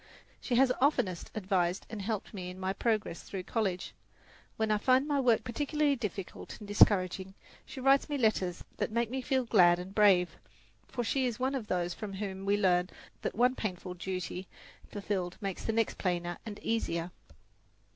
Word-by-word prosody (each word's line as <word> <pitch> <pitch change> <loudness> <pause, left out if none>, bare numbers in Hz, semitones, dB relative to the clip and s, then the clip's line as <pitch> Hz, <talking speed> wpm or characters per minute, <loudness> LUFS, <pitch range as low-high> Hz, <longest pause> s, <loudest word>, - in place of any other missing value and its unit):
She 245 - -1
has 260 +1 +5
oftenest 245 - +1
advised 185 -3 0
and 220 -2 -6
helped 215 +1 -3
me 180 -3 -5
in 180 +1 -9
my 190 0 -1
progress 215 -4 -1
through 190 -2 -6
college. 190 -4 -2 0.6
When 220 -1 +1
I 210 - +3
find 260 +5 +3
my 290 -2 +1
work 240 -4 +3
particularly 290 +3 +1
difficult 210 -6 -6
and 210 - -10
discouraging, 190 -2 +3 0.3
she - - -8
writes 270 +2 +4
me 290 - -1
letters 195 -7 +1
that - - -1
make 235 0 0
me 260 0 -2
feel 260 0 +1
glad 180 -6 +6
and 180 +2 -7
brave; 195 -4 +4 0.5
for 240 - -3
she 260 +2 +1
is 235 -3 -3
one 260 +2 0
of 250 -6 -3
those 175 -2 0
from 210 0 -6
whom 195 -1 -5
we 200 +1 +3
learn 180 -2 +3 0.3
that - - -3
one 250 +3 +4
painful 185 -6 -4
duty 185 0 -4 0.4
fulfilled 195 -3 -3
makes 195 -2 -4
the - - +1
next 225 0 0
plainer 175 -2 -1
and 205 -2 -6
easier. 175 -6 -1
205 Hz, 175 wpm, -31 LUFS, 185-240 Hz, 0.6 s, glad